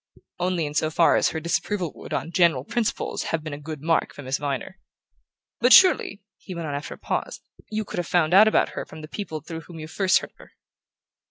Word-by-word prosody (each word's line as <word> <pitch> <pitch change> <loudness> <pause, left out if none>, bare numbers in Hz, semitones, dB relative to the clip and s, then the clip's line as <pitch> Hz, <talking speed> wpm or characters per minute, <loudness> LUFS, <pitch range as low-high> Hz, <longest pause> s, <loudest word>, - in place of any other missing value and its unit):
"Only 180 -2 0
in 145 - -5
so 155 +1 +1
far 165 +1 +4
as - - +3
her 160 - -4
disapproval 170 +2 -1
would, - - -12
on 165 - -3
general 170 -7 +3
principles, 225 +8 -2
have 165 -2 -2
been 155 -2 -6
a 145 - -6
good 150 -1 -8
mark 165 0 +1
for 145 - -9
Miss 130 +1 -2
Viner. 145 +6 -4 0.8
But 250 +2 +5
surely," 365 - +5 0.2
he 185 - -9
went 170 -1 -4
on 145 - -4
after 145 +1 -5
a - - -20
pause, - - -3 0.3
"you 215 0 -2
could - - -5
have 175 - -3
found 175 -2 +2
out 210 +3 +8
about 220 - +3
her - - -5
from 160 - -11
the 155 - -8
people 160 -3 -6
through 160 +1 -7
whom 170 0 -12
you 155 -1 -7
first 185 +3 +2
heard - - -5
of - - -49
her?" - - -17
165 Hz, 235 wpm, -24 LUFS, 155-185 Hz, 0.8 s, out